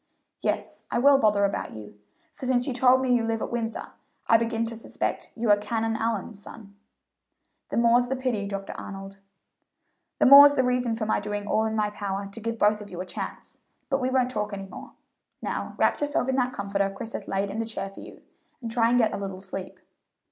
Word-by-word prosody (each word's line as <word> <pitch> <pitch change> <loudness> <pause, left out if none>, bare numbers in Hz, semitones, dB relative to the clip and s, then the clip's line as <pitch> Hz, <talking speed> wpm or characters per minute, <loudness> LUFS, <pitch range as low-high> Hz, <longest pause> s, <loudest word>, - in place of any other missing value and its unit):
"Yes, - - -3
I - - -1
will 275 +2 +6
bother 205 -3 +3
about 200 - -3
you, 105 -1 -11 0.3
for 260 - -7
since 250 -1 +2
you 270 - -2
told 255 +1 +4
me 255 -1 +2
you 240 -2 +2
live 225 0 -1
at - - -4
Windsor, 230 -1 -3 0.4
I 225 - +5
begin 230 0 -1
to 230 0 -5
suspect 225 - -4
you 230 -2 +1
are 205 - +6
Canon 225 +1 -2
Allyn's 220 -2 -2
son." 205 -1 -12 0.9
"The - - -3
more's 235 +1 +4
the 265 - -1
pity, 245 -6 -2
Dr. 195 -1 -5
Arnold." 195 0 -8 1.0
"The - - +3
more's 285 +2 +10
the 260 - +3
reason 250 -2 0
for 225 -1 -3
my 215 - +1
doing 205 0 -4
all 220 +1 +1
in 220 0 -2
my 210 -1 0
power 200 -1 -4
to 200 +3 -9
give 230 +1 -3
both 210 0 +3
of 205 - -10
you 180 - -8
another 180 0 -5
chance - - -7 0.3
But 270 0 +1
we 255 - +1
won't 255 -1 +1
talk 210 -2 -3
any 195 -1 -5
more. 195 - -11 0.5
Now - - -4
wrap - - +2
yourself 290 -3 0
in 265 - +1
that 250 -1 +1
comforter 200 -3 -1
Chris 225 +4 -7
has - - -5
laid 195 +1 -1
in 215 - -4
the 225 - -1
chair 195 -3 -5
for - - -13
you, - - -12 0.4
and 230 -3 -6
try 230 -1 +3
and 245 - +3
get 225 -3 +3
a - - -2
little 195 -2 -5
sleep." 190 0 -7
225 Hz, 220 wpm, -26 LUFS, 200-245 Hz, 1.0 s, more's